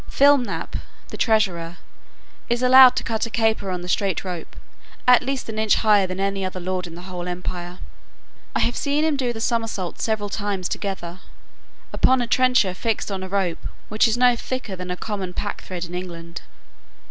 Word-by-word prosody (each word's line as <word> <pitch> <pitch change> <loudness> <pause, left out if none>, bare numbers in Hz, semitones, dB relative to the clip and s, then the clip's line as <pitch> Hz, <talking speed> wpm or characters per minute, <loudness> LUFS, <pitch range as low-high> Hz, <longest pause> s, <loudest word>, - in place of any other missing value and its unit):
Flimnap, 280 -2 +2 0.3
the - - -7
treasurer, 180 -7 +1 0.7
is 240 +1 0
allowed 255 0 +8
to - - -1
cut 225 0 -1
a - - -8
caper 220 -3 0
on 180 -1 -3
the 180 - -7
straight 190 -1 0
rope, 180 -3 -6 0.5
at 250 -1 +7
least 265 +1 -3
an 220 -1 -4
inch 220 -1 +3
higher 210 -3 +4
than 185 +1 -5
any 195 0 -1
other 185 0 -3
lord 180 0 -3
in 165 - -10
the 175 - -10
whole 180 -1 -6
empire. 180 0 -5 0.8
I - - +2
have 240 - +1
seen 290 +2 0
him 315 -2 +2
do 255 -3 -1
the 225 - -6
summerset 225 -6 -2
several 215 -2 -1
times 200 -3 -2
together, 185 -3 -4 0.7
upon 260 0 +4
a 245 - 0
trencher 250 -5 +3
fixed 215 +2 -2
on 190 -1 -3
a 190 - -6
rope 190 -3 -1 0.3
which 215 +2 +3
is 225 +1 0
no 250 0 +5
thicker 240 -4 -4
than 180 0 -7
a 180 - -3
common 195 -4 -4
packthread 185 -3 -4
in 175 - -10
England. 170 -2 -6
200 Hz, 185 wpm, -23 LUFS, 180-235 Hz, 0.8 s, allowed